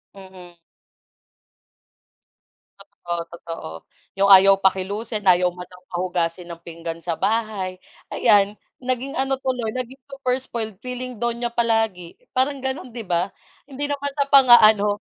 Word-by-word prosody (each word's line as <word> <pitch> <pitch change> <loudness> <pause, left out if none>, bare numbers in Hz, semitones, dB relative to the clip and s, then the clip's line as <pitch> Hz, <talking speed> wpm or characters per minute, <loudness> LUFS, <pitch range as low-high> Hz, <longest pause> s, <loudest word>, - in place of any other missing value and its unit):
Mm. 185 -3 -14 2.2
Totoo, 175 0 -7 0.2
totoo 165 - -8 0.5
yung 200 0 +4
ayaw 195 +1 +8
pakilusin 200 +3 -1
ayaw 180 0 +5
man 180 0 -10
lang 180 0 -17
pahugasin 175 -1 -2
ng 170 - -9
pinggan 165 0 -7
sa 170 0 -3
bahay. 205 -3 -2 0.3
Ayan, 205 0 +3 0.2
naging 255 +3 -2
ano 270 -3 -1
tuloy 250 -4 -2
naging 255 +2 -6
super 265 -2 -1
spoiled 225 -5 -5
feeling 250 0 -6
donya 235 0 -1
palagi, 225 -7 0 0.2
parang 275 +2 +1
gano'n 265 -1 -4
'di 230 0 -7
ba? 175 +2 0 0.4
Hindi 285 +1 -4
naman 285 0 -3
sa 280 -1 0
pang-aano. 220 -7 +6
215 Hz, 125 wpm, -22 LUFS, 180-255 Hz, 2.2 s, ayaw